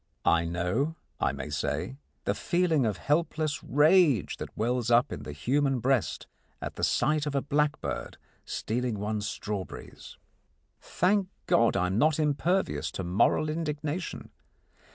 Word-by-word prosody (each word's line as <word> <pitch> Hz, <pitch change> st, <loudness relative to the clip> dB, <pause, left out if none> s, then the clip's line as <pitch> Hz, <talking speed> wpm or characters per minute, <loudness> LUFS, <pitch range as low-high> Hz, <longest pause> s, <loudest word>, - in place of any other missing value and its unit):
I 85 Hz, 0 st, +4 dB
know, 90 Hz, -, -1 dB, 0.2 s
I -, -, +2 dB
may 70 Hz, +1 st, -6 dB
say, 75 Hz, -, -2 dB, 0.3 s
the -, -, +2 dB
feeling 170 Hz, -8 st, +1 dB
of 105 Hz, -, -1 dB
helpless 155 Hz, 0 st, 0 dB
rage 150 Hz, -, +4 dB
that -, -, -8 dB
wells 120 Hz, +1 st, 0 dB
up 120 Hz, +3 st, +4 dB
in -, -, -5 dB
the -, -, -7 dB
human 135 Hz, -, +1 dB
breast 130 Hz, -1 st, 0 dB, 0.3 s
at -, -, -5 dB
the -, -, -6 dB
sight 150 Hz, +3 st, +2 dB
of 145 Hz, -, -3 dB
a 140 Hz, -, +2 dB
blackbird 145 Hz, -, -1 dB, 0.3 s
stealing 120 Hz, 0 st, -2 dB
one's 105 Hz, 0 st, -2 dB
strawberries. 105 Hz, -3 st, -6 dB, 0.6 s
Thank 190 Hz, +2 st, +1 dB, 0.2 s
God, 115 Hz, -3 st, +3 dB
I 90 Hz, -, +2 dB
am 95 Hz, +4 st, 0 dB
not 155 Hz, 0 st, +3 dB
impervious 160 Hz, +5 st, 0 dB
to 95 Hz, -, -4 dB
moral 100 Hz, -, +2 dB
indignation. 155 Hz, +1 st, -3 dB
135 Hz, 140 wpm, -28 LUFS, 105-155 Hz, 0.6 s, I